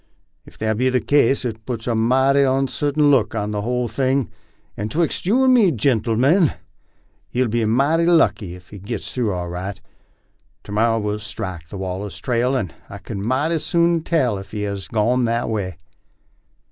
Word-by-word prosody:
Ef - - -16
that 110 -1 -1
be 130 +2 +2
the 130 0 +2
case, 140 -1 +2
it 110 -2 -4
puts 115 -2 -5
a 120 - 0
mighty 130 +5 +3
onsartain 140 +2 +1
look 115 -6 +2
on 105 -1 -2
the 105 -1 -2
whole 125 +2 -1
thing, 130 0 0 0.4
and 105 +2 -4
twixt 170 +4 -1
you 245 +7 +3
and 260 -1 +5
me, 215 -8 +5
gentlemen, 130 - +2 0.7
he'll 125 0 0
be 115 0 0
mighty 140 +9 +2
lucky 125 - +2
ef 90 -1 -16
he 100 - -10
gits 100 +2 -5
through 120 -5 0
all 90 -2 -3
right. 95 +3 -5 0.8
To - - -10
morrow 115 +2 +2
we'll 105 -1 -2
strike 100 -6 -6
the 100 - -7
Wallace 95 +1 -5
trail, 125 +2 0
and 100 -9 -2 0.2
I - - -8
kin 100 - -7
mighty 140 +9 0
soon 170 0 +2
tell 130 - 0
ef 95 0 -10
he 105 0 -4
has 100 -2 -4
gone 120 +3 +1
that 115 +1 0
way." 95 -6 -3
115 Hz, 180 wpm, -21 LUFS, 105-135 Hz, 0.8 s, and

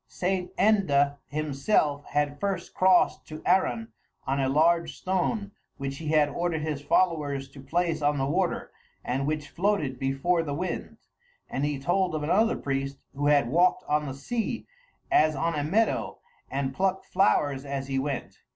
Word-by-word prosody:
St. 180 0 -2
Enda 145 -10 +3
himself 145 +1 0
had 145 0 -1
first 195 -3 -2
crossed 185 -1 +3
to 155 0 -9
Arran 120 -11 +2 0.4
on 135 +1 0
a 135 -1 +1
large 165 +4 +2
stone 195 +3 -1 0.3
which 135 0 -4
he 160 - -6
had 150 -1 +4
ordered 160 +1 -2
his 150 -2 -3
followers 145 -4 +1
to 135 0 -12
place 165 +1 -1
on 145 0 +2
the 135 - 0
water 175 +5 -1 0.3
and 135 +3 -1
which 150 -1 -2
floated 170 -9 0
before 135 +6 +1
the 145 -3 -3
wind; 180 +4 -4 0.5
and 135 - -2
he 145 -1 -1
told 175 +4 +1
of 150 - -2
another 210 +9 +2
priest 135 0 -2 0.2
who 145 +1 -1
had 145 -4 +4
walked 175 +6 +3
on 150 0 +1
the 135 - -5
sea 225 - -3 0.5
as 155 0 +4
on 165 +5 0
a 145 - -1
meadow 210 +9 +1 0.3
and 135 0 -2
plucked 190 +3 0
flowers 145 -8 +2
as 140 -1 -4
he 135 -1 -1
went. 140 -1 -4
150 Hz, 165 wpm, -27 LUFS, 140-180 Hz, 0.5 s, had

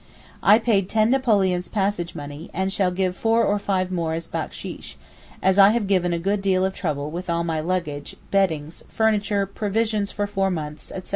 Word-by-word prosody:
I 210 +2 +7
paid 215 -5 +1
ten 220 +1 +3
napoleons 200 -9 +2
passage 195 -4 -1
money, 145 +3 -8
and 190 0 -1
shall 190 -3 +2
give 180 0 -1
four 225 +2 +2
or 205 0 +1
five 185 -2 -1
more 165 -3 -1
as 165 0 -4
backsheesh, - - -6 0.5
as 190 +1 +3
I 195 0 +9
have 235 -3 0
given 185 -3 +1
a 170 - 0
good 195 +4 -1
deal 190 -1 +2
of 190 - -1
trouble 150 -5 -3
with 175 +2 -6
all 170 0 +1
my 165 -2 -1
luggage, 155 -4 -3 0.2
beddings, 165 -6 0
furniture, 210 -2 +1
provisions 210 +1 -1
for 205 - -2
four 195 -1 0
months, 155 -4 -5
etc. 185 - -7
190 Hz, 190 wpm, -23 LUFS, 170-205 Hz, 0.5 s, I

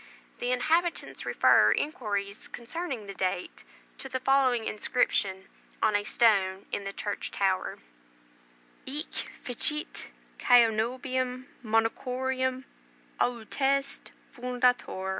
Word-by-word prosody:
The 245 - -1
inhabitants 325 +7 0
refer - - +5
inquirers 205 -8 -2
concerning 245 -1 -5
the 200 - -7
date 185 -1 -3 0.4
to 265 - -4
the 260 - -2
following 255 -3 +3
inscription 195 -4 0 0.3
on 215 -1 +2
a 205 - +2
stone 195 -4 +3
in 200 - -3
the 195 - -3
church 205 +1 -4
tower: 190 -2 0 1.1
"Hic 295 +5 -4 0.3
fecit 300 +5 -1 0.3
Caenobium 250 +2 +2 0.2
Monachorum 255 +3 0 0.6
Auteste 270 +4 0 0.2
fundator. 245 -6 0
245 Hz, 95 wpm, -29 LUFS, 205-260 Hz, 1.1 s, refer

